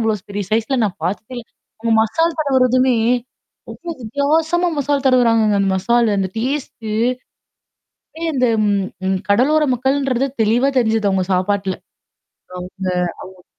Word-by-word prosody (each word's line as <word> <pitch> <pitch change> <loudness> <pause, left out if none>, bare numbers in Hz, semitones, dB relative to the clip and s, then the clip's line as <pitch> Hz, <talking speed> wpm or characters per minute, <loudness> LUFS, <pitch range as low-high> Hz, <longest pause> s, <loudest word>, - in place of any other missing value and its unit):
அவ்வளோ 215 -3 -1
பெரிய 200 0 -3
சைஸ்ல 230 +4 +1
நான் 200 -4 -3
பார்த்துக்கே 205 +7 -4
இல்ல. 240 - -9 0.4
உங்க 230 -1 +1
மசால் 325 +10 0
தடவறதுமே, 255 -3 +3 0.7
ரொம்ப - - -12
வித்தியாசமா 315 +9 +1
மசால் 285 0 0
தட்வுறாங்கங்க. 230 -5 +3
அந்த 195 - +1
மசாலு 235 +4 +2
அந்த 190 -1 0
டேஸ்ட்டு. 240 -3 -3 1.3
அ - - -9
இந்த 255 -2 +2 0.2
ம் 205 - +2 0.3
ம் 190 0 0
கடலோர 280 +9 +3
மக்கள்ன்றது 265 0 0 0.2
தெளிவா 240 +6 +2
தெரிஞ்சது 220 -3 +1
அவுங்க 190 -1 0
சாப்பாடல. 195 +1 0 0.8
அவுங்க 185 +1 -5 0.4
அவுங் 185 -1 -15
230 Hz, 130 wpm, -18 LUFS, 205-270 Hz, 1.3 s, தடவறதுமே